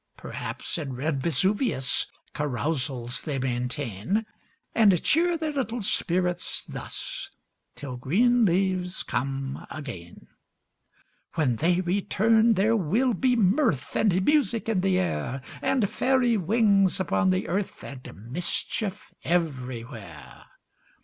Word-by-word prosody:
Perhaps, - - -4
in 140 -4 -4
red 135 +2 -1
Vesuvius 170 - +1 0.3
Carousals 135 -3 -1
they 145 -4 -3
maintain; 125 - -2 0.5
And 200 -6 +4
cheer 340 +2 +3
their 315 -1 -2
little 245 -5 -2
spirits 180 -1 -1
thus, - - -6 0.5
Till 130 -4 -6
green 235 - +3
leaves 185 -1 +1
come 135 +1 -3
again. 120 - -8 1.1
When 130 -7 +1
they 175 +5 +2
return, 215 +5 +3
there 210 +4 +3
will 225 - +2
be 250 +5 +2
mirth 200 - +2
And 190 -3 +2
music 250 -8 +2
in 215 -5 +1
the 190 -1 +2
air, 130 - -2 0.2
And 250 -7 +2
fairy 250 +1 +2
wings 200 -1 +3
upon 190 +1 +1
the 185 0 0
earth, 190 +3 -3
And 125 -4 -10
mischief 185 - -2
everywhere. 125 - -4
180 Hz, 110 wpm, -26 LUFS, 135-220 Hz, 1.1 s, And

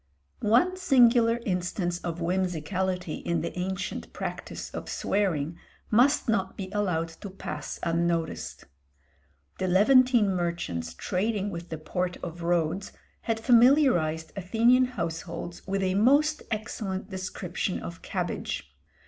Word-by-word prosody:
One 350 - +3
singular 240 -7 +5
instance 180 -1 -1
of 170 -1 -4
whimsicality 180 0 -1
in 170 -2 -1
the 170 - -4
ancient 190 +1 -3
practice - - -5
of - - -6
swearing 170 -6 -1 0.3
must 260 +7 +4
not 195 -4 0
be 190 -1 -5
allowed 180 -6 0
to 165 +5 -9
pass 155 -6 -6
unnoticed. 170 -1 -1 0.9
The 185 - 0
Levantine 225 +2 +5
merchants 170 - -2
trading 205 +1 -1
with 170 -1 -7
the 160 - -4
port 175 +4 -3
of 170 0 -6
Rhodes 170 +2 0 0.3
had 225 -1 -1
familiarized 230 - +4
Athenian 230 +7 +4
households 175 -6 -5
with 195 0 0
a 185 -1 +1
most 285 +9 +4
excellent 210 -3 -4
description 185 -1 -3
of 170 - -8
cabbage. 65 - -4
185 Hz, 120 wpm, -27 LUFS, 170-225 Hz, 0.9 s, singular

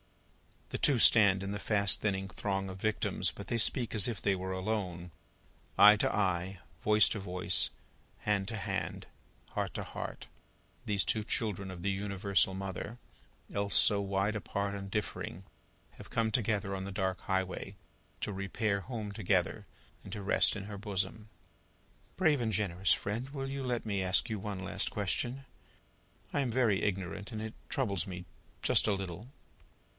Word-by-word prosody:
The - - -3
two 140 -4 +5
stand 100 -4 +6
in 100 - -3
the 100 - -3
fast 100 -2 +3
thinning 95 -2 0
throng 95 -1 -2
of 95 0 -8
victims, 110 0 +1
but - - -9
they 115 - +1
speak 120 +1 +1
as 105 -4 +5
if 115 -3 -3
they 100 -1 +1
were 95 0 -4
alone. 95 -3 -3 0.7
Eye 105 +1 +9
to - - +2
eye, 95 -1 0 0.2
voice 105 0 +5
to 105 - -1
voice, 90 -1 +2 0.5
hand 100 -2 0
to 110 - -4
hand, 100 - -3 0.4
heart - - -3
to - - -2
heart, - - -6 0.6
these 100 -3 +1
two 110 - +1
children 100 -3 -1
of 90 -2 -7
the 100 - +1
Universal 100 -1 +1
Mother, 95 +4 -5 0.6
else 100 0 -1
so 100 -1 +5
wide 100 +2 0
apart 100 -1 -2
and 100 -1 -6
differing, 95 -3 -3 0.5
have - - -13
come 115 -1 +1
together 105 -4 0
on 95 0 -3
the 100 - -5
dark 95 -1 -1
highway, 95 +1 -2 0.5
to 105 - -2
repair 100 +2 -1
home 110 -1 -5
together, 100 -3 0 0.4
and - - -10
to 105 - -5
rest 95 - +3
in 105 - -5
her 100 0 -7
bosom. 105 +1 -3 0.9
"Brave 160 -6 +3
and 110 -2 0
generous 95 -2 +2
friend, 115 +6 -3
will 135 -2 -4
you 135 0 -3
let 125 -3 -2
me 100 -3 -1
ask 95 +4 +3
you 110 - -2
one 100 -1 -5
last 100 +1 +2
question? 120 +6 -2 0.9
I - - +1
am 135 -3 +1
very 115 -5 +2
ignorant, 100 +2 -2
and 110 - -4
it 110 0 -5 0.2
troubles 100 - 0
me 90 -1 -6 0.4
just - - +4
a 105 - +3
little." 95 +2 -5
100 Hz, 170 wpm, -32 LUFS, 95-110 Hz, 0.9 s, Eye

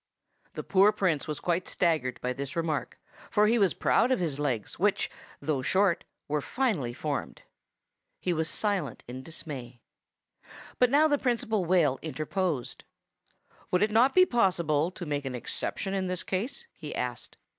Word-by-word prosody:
The - - -4
poor 200 +2 +5
Prince 170 -9 0
was 150 - -3
quite 175 +1 -1
staggered 155 -8 +1
by 125 0 -1
this 140 +4 -5
remark, 165 -3 -2 0.3
for 210 -1 +4
he 230 +2 +3
was 195 -3 +3
proud 240 +3 +3
of 260 - +3
his 155 -6 -2
legs, 125 -8 -2
which, - - +1 0.3
though 150 -4 -1
short, 190 +5 +2 0.2
were 150 0 0
finely 195 - 0
formed. 145 +3 -4 0.8
He 180 - 0
was 160 0 0
silent 195 - -1
in 125 +2 -6
dismay. 130 -6 -7 1.0
But 250 - +5
now 295 +4 +5
the 290 -2 +2
Principal 230 -6 0
Whale 165 -7 +3
interposed. 155 -2 -2 0.9
"Would 180 +2 +3
it 210 - +1
not 240 +5 +4
be 370 0 +8
possible 170 - +2
to 180 -1 -8
make 145 -2 -2
an 130 -2 -4
exception 190 +9 -3
in 190 -1 -1
this 180 0 -2
case?" 235 - -3
he - - -7
asked. - - -4
175 Hz, 160 wpm, -29 LUFS, 145-205 Hz, 1.0 s, be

